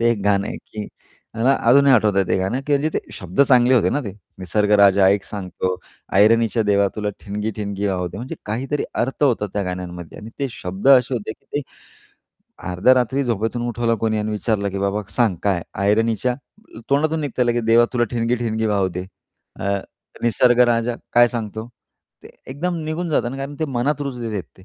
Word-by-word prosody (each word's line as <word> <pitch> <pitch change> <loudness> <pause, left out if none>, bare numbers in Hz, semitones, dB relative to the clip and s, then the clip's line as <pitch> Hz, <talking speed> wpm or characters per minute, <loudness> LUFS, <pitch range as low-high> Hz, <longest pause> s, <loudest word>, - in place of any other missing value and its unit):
ते 115 0 +3
एक 115 - 0
गाणं 100 -1 +2
आहे, - - -5
की 105 -1 -8 0.5
मला 120 +4 +3 0.2
अजूनही 140 +2 +6
आठवतंय 105 -4 +3
ते - - +2
गाणं 95 +8 -1
की 150 - 0
म्हणजे 145 +3 0
ते - - +2
शब्द 90 +6 -3
चांगले 130 -2 +5
होते 120 - +3
ना 145 - 0
ते. 100 - -5 0.3
निसर्ग 105 +3 0
राजा 100 -1 +6
ऐक 100 0 +3
सांगतो, 95 -2 -4 0.4
ऐरणीच्या 115 +2 +4
देवा 100 -1 +2
तुला 105 -1 -2 0.2
ठिणगी 105 +2 -3
ठिणगी 100 -1 -3
वाहू 90 -2 -1
दे, - - -10
म्हणजे 130 +9 -6
काहीतरी 130 +7 -2
अर्थ 130 +4 -2
होता 120 -6 +1
त्या 105 - -1
गाण्यांमध्ये 90 -2 -6
आणि 110 - -9
ते 140 -2 -1
शब्द 95 +3 -3
असे 130 -1 +5
होते 110 -2 -4
की - - -27
ते - - +1 1.1
अर्ध्या 95 +9 +4
रात्री 130 +2 +1
झोपेतून 115 0 -1
उठवलं 115 0 0
कोणी 110 0 -1
आणि 105 0 -2
विचारलं 105 -1 -1
की, 100 - -4
"बाबा 100 +2 -1
सांग 115 -7 +2
काय? 95 -4 +1 0.2
ऐरणीच्या," 110 +4 +1 0.6
तोंडातून 155 +3 +2
निघतं 130 -4 -1
लगेच, 120 -1 0
"देवा 115 +1 +5
तुला 120 -2 +2
ठिणगी 120 0 0
ठिणगी 110 -2 -1
वाहू 100 -3 +1
दे." 90 +1 -6 0.5
अ, 100 0 0 0.4
निसर्ग 120 +1 +3
राजा, 120 0 +1 0.2
काय 120 0 +6
सांगतो? 110 -1 -5 0.5
ते - - -12 0.2
एकदम 175 +6 -2
निघून 160 +3 -3
जाता 145 -6 +1
ना 130 - -6
कारण 135 +1 -5
ते - - +2
मनात 135 +1 -1
रुजलेले 125 -5 -4
आहेत 95 - -4
ते. 95 - -16
115 Hz, 190 wpm, -21 LUFS, 100-125 Hz, 1.1 s, अजूनही